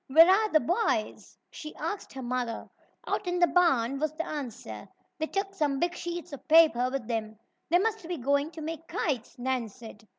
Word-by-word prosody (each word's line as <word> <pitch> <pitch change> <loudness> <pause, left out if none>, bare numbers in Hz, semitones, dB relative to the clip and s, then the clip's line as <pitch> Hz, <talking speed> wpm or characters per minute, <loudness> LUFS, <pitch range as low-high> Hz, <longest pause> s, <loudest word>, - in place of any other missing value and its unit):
"Where 320 +5 +8
are 425 +4 +4
the 310 - +6
boys?" 350 - -1
she 305 0 -8
asked 335 +6 -4
her 265 -1 -6
mother. 245 -2 -3 0.4
"Out 395 - -2
in 355 0 0
the 350 - +6
barn," 275 -7 +2
was 310 0 0
the 325 +2 -3
answer. 230 - -6 0.3
"They 315 - -1
took 390 +2 -2
some 295 -7 0
big 345 +4 0
sheets 345 -3 -5
of 280 - -9
paper 310 -6 +6
with 260 -4 -4
them." 220 -2 -3 0.3
"They 345 - +5
must 430 -2 -1
be 350 -1 -3
going 280 +3 +1
to 320 - -8
make 325 +1 -6
kites," 265 -8 -2
Nan 250 -2 -1
said. 220 -1 -13
305 Hz, 195 wpm, -29 LUFS, 250-345 Hz, 0.4 s, Where